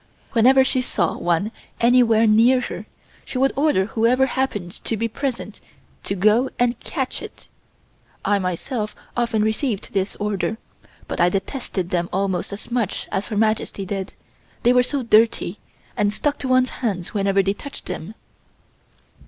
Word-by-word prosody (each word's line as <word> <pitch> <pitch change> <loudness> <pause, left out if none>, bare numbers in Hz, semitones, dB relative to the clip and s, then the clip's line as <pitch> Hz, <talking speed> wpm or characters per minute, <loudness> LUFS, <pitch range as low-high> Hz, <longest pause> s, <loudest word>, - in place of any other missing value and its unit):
Whenever 260 +3 +6
she 260 0 +1
saw 180 -8 0
one 175 +5 0 0.3
anywhere 235 -2 +5
near 230 +4 +5
her, 245 - -6 0.4
she - - -6
would 270 +1 +2
order 280 -10 +2
whoever 235 +5 +2
happened 255 -9 -2
to 225 - -1
be 230 +2 0
present 250 +2 -4 0.4
to 195 - -2
go 215 +7 +3
and 245 -1 +1
catch 265 -5 -3
it. - - -11 0.8
I 205 -1 +3
myself 210 - -3 0.2
often 230 -3 +1
received 220 0 -1
this 195 0 -1
order, 210 +1 -2 0.5
but - - -2
I 175 - +5
detested 195 -2 -3
them 175 -1 0
almost 190 -1 -1
as 200 +4 -7
much 235 -5 -1
as 195 - -1
Her 215 - -3
Majesty 215 -2 0
did, 195 0 -4 0.5
they 245 - +5
were 250 - +6
so 265 +2 -1
dirty, 220 -4 +3 0.4
and 205 0 +2
stuck 285 +7 -1
to 265 - -3
one's 255 0 +3
hands 195 -8 -2
whenever 195 -1 +2
they 195 +1 +1
touched 280 +7 -10
them. 195 +8 -6
220 Hz, 155 wpm, -22 LUFS, 195-250 Hz, 0.8 s, Whenever